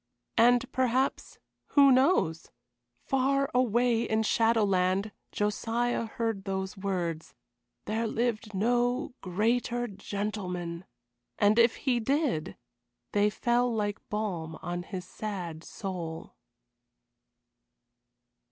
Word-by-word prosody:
And 245 +2 +4
perhaps 260 +1 0 0.4
who 280 -1 +8
knows? 255 - +3 0.6
Far 275 +1 +1
away 240 -1 +3
in 220 -1 +1
Shadowland 205 -3 +2 0.2
Josiah 230 +3 -1
heard 225 -3 -2
those 190 0 -3
words, 180 -5 -3 0.5
"There 225 +2 -1
lived 220 -2 -2
no 245 +6 +1
greater 235 +6 0
gentleman." 190 -4 -4 0.5
And 210 +2 +4
if 230 0 +5
he 250 -3 0
did 265 - 0 0.5
they 205 0 +3
fell 240 +3 +1
like 210 -2 -1
balm 175 -7 -3
on 175 +1 -3
his 180 -1 -6
sad 180 -5 -5
soul. 175 -6 -6
215 Hz, 95 wpm, -29 LUFS, 190-240 Hz, 0.6 s, who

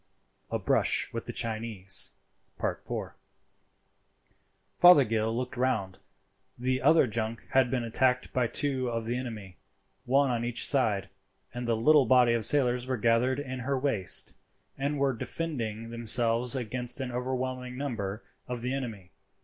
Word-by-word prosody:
A - - -1
BRUSH - - +1
WITH 115 - -5
THE - - -3
CHINESE.—IV. 110 -4 -2 1.8
Fothergill 115 -10 +5
looked 125 +2 -4
round. 110 -7 -1 0.6
The 130 +1 -1
other 155 +2 +5
junk 115 0 -4
had 130 -2 +3
been 125 -1 -1
attacked 125 +2 0
by 125 -2 +1
two 130 0 +2
of 115 -1 -3
the 120 +2 -2
enemy, 110 -8 -7 0.5
one 135 +1 +2
on 120 -1 -2
each 120 0 0
side, 110 -9 +2 0.5
and 120 0 -5
the 115 -1 +1
little 145 +2 +4
body 125 -1 +5
of 115 -2 0
sailors 125 -2 +2
were 130 -1 -1
gathered 115 +4 +1
in 130 -3 -5
her 135 +2 -2
waist, 130 -9 +1 0.4
and 140 +2 -2
were 135 -1 +1
defending 115 -5 -5
themselves 115 +1 +3
against 125 +1 -2
an 130 -2 -4
overwhelming 125 0 -4
number 110 -7 -4 0.2
of 125 -1 -5
the 125 +1 -2
enemy. 115 -9 -6
125 Hz, 140 wpm, -28 LUFS, 115-130 Hz, 1.8 s, Fothergill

